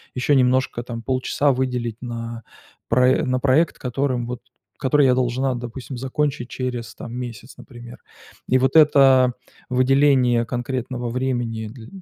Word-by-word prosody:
еще 135 +3 +2
немножко, 130 -1 +1
там, 115 -1 -6
полчаса 130 +3 0
выделить 125 -3 -2
на 115 -1 -6 0.5
прое 125 +2 +3
на 130 0 0
проект, 140 +5 +2
которым 125 -1 -2
вот 125 0 -6 0.4
который 140 +2 +3
я 130 - +4
должна, 130 +1 0
допустим, 120 +2 -7
закончить 135 0 -2
через, 120 -4 -5
там, 115 - -9
месяц, 120 0 -7
например. 120 -1 -12 0.5
И 130 - +4
вот 130 +3 +1
это 135 -5 +6 0.4
выделение 130 -2 +3
конкретного 125 0 -4
времени 120 -3 -2
дль 110 +1 -11
125 Hz, 135 wpm, -22 LUFS, 120-130 Hz, 0.5 s, это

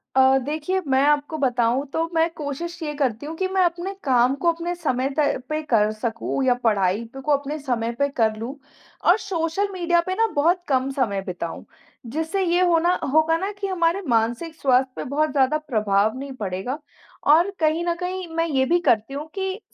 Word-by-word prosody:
अ, 265 0 +6
देखिए 305 +7 -2
मैं 265 0 +3
आपको 295 +2 +1
बताऊँ 250 -1 +1
तो 325 - +1
मैं 325 +1 +3
कोशिश 335 +3 -5
ये 300 -1 -3
करती 265 -3 -1
हूँ 315 +2 -5
कि, 375 - 0
मैं 380 0 +1
अपने 350 +2 -1
काम 255 -1 +3
को 340 - +5
अपने 340 +1 -4
समय 270 -6 -1
तय 295 -2 +2
पे 310 0 -1
कर 215 -7 +2
सकूँ 225 +4 -3
या 250 - +5
पढ़ाई 205 -1 +2
पे 270 - -8
को 295 - -1
अपने 285 +1 0
समय 240 -5 -1
पे 280 - +3
कर 225 -5 +1
लूँ 240 +5 -5 0.5
और 360 - +7
सोशल 375 0 -1
मीडिया 345 -2 +2
पे 370 +2 -3
ना 455 +2 +3
बहुत 340 +5 +3
कम 265 -1 +1
समय 230 -8 -1
बिताऊँ, 180 -3 -6 0.4
जिससे 320 - -2
ये 350 0 +2
होना 345 0 +3 0.2
होगा 315 +1 +4
ना 385 +4 -3
कि 395 - -2
हमारे 355 0 +1
मानसिक 235 +7 0
स्वास्थ्य 260 -1 +3
पे - - -4
बहुत 305 +2 +1
ज़्यादा 275 +2 +2
प्रभाव 215 -6 +1
नहीं 275 0 -6
पड़ेगा 195 +6 -3 0.6
और 340 +5 +4
कहीं 315 +1 +2
न 340 -1 0
कहीं 365 0 -3
मैं 330 0 +1
ये 265 -4 +1
भी 345 +6 +3
करती 225 +2 +2
हूँ 290 +3 -5
कि 385 0 -2
290 Hz, 200 wpm, -23 LUFS, 250-340 Hz, 0.6 s, और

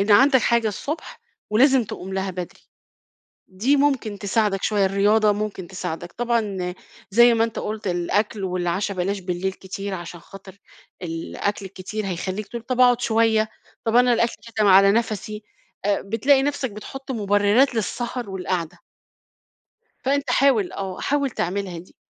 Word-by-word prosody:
إن 200 +2 0
عندَك 265 +3 +6
حاجة 235 -2 +2
الصبح، 295 - -5 0.3
ولازم 260 +3 +4
تقوم 190 -1 -7
لها 190 0 -1
بدري، 180 -1 -7 0.9
دي 220 +10 +1
ممكن 270 -8 +1
تساعدَك 200 -1 0
شوية، 205 -2 +2
الرياضة 205 +2 +3
ممكن 205 -3 -4
تساعدَك، 175 -2 -5
طبعًا 210 -7 -1 0.4
زي 235 +3 +6
ما 225 - +3
أنت 230 -1 -4
قُلت 215 -1 -4
الأكل 195 +4 -1
والعشا 185 +2 -1
بلاش 195 +2 -1
بالليل 180 +1 -2
كتير، 195 +1 -6
علشان 175 -1 -8
خاطر 195 +2 -13 0.4
الأكل 180 +4 -3
الكتير 195 +3 -6
هيخلِّيك 190 +3 -4
تقول 235 -1 -6
طَب 255 +1 -2
أقعُد 245 -1 +5
شوية، 220 -2 +2 0.4
طَب 225 +1 +1
أنا 250 0 +5
الأكل 235 0 +1
كاتم 215 -2 0
على 195 +1 +7
نفسي، 215 -2 -2 0.4
آآ 205 -1 +1
بتلاقي 260 +7 +3
نفسَك 280 -3 -1
بتحُطّ 270 +6 -9
مُبررات 205 +4 +3
للسهر 235 +1 -3
والقعدة. 180 -3 -3 1.2
فانت 275 -1 0
حاول 250 -7 +3
آه، 190 -2 -5
حاول 280 -1 0
تعملها 190 -5 -3
دي، 175 - -14
210 Hz, 145 wpm, -23 LUFS, 190-235 Hz, 1.2 s, على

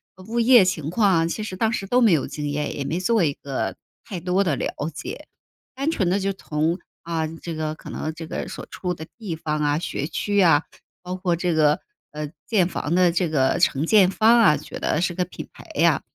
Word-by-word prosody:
呃 185 - -14
物 235 +2 -2
业 235 -4 +7
情 160 -5 -1
况 200 +1 +3
啊， 165 0 +2
其 215 +5 -3
实 190 -3 -5
当 220 +3 +1
时 195 -4 -2
都 245 +5 +2
没 215 -7 +6
有 150 - +2
经 145 +1 -4
验， 150 +1 -2
也 140 - -3
没 165 +5 -2
做 215 0 +2
一 145 -3 +1
个 130 -11 -4 0.3
太 185 -4 -6
多 180 +3 +1
的 160 -7 +1
了 - - -3 0.2
解。 155 - -7 0.5
单 280 +4 0
纯 190 - 0
地 195 +2 +2
就 195 0 -1
从 160 0 -1 0.2
啊， 165 -1 -2
这 165 +1 -7
个 155 0 -3
可 - - -10
能 155 - -3
这 165 -1 -7
个 - - -4
所 - - -7
处 180 -2 -3
的 160 - -8
地 190 -7 -4
方 155 -1 -2
啊， 145 0 +2
学 150 -3 -3
区 205 +4 -2
呀， 165 -5 +5 0.4
包 180 +1 -4
括 180 -2 0
这 175 0 0
个， 150 -1 +3 0.3
呃， 150 0 -4 0.2
建 190 -6 +3
房 165 -2 -3
的 180 -2 +4
这 175 0 +1
个 135 -4 +2
承 140 +4 +2
建 195 -1 +5
方 225 +4 +5
啊， 150 -10 +5
觉 150 - -8
得 160 - 0
是 180 -1 0
个 180 - 0
品 180 - -9
牌 - - -14
呀， - - +3
175 Hz, 250 characters per minute, -23 LUFS, 155-195 Hz, 0.5 s, 业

